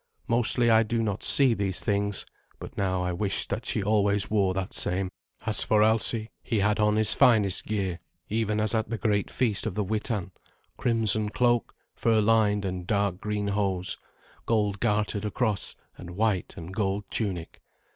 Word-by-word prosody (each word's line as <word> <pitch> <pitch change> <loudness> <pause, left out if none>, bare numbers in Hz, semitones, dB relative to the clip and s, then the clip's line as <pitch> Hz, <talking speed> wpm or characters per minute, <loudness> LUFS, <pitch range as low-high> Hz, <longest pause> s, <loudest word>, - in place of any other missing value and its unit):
Mostly 120 0 +3
I 110 0 +5
do 115 +1 -1
not 105 -2 -3
see 135 -4 +6
these 95 -3 -2
things, 100 -1 0 0.3
but - - -10
now 95 -2 -1
I 90 - -1
wished 100 +2 -2
that 110 +5 -3
she 105 - 0
always 100 -1 +1
wore 100 -3 +1
that 95 0 -4
same. 95 +1 0 0.3
As - - +4
for 105 -1 +3
Alsi, 110 0 +1
he 115 - -2
had 105 +1 +1
on 105 0 +2
his 110 0 +6
finest 105 -6 +3
gear, 95 -5 -2 0.3
even 110 -1 -1
as 110 +1 +2
at 110 -2 -1
the 115 - -3
great 105 -3 -1
feast 110 -6 -1
of - - -4
the 105 - -1
Witan 105 -2 -3 0.4
crimson 110 -3 +2
cloak, 120 +1 0 0.2
fur 115 -1 +1
lined, 105 -2 +2
and 90 -1 -5
dark 100 -3 0
green 105 -1 -2
hose, 95 -2 -1 0.5
gold 105 -3 0
gartered 105 0 -1
across, 105 -1 -1 0.2
and 85 - -9
white 105 -3 -1
and 85 +3 -8
gold 100 0 -1
tunic. 95 -7 -3
105 Hz, 170 wpm, -26 LUFS, 100-110 Hz, 0.5 s, see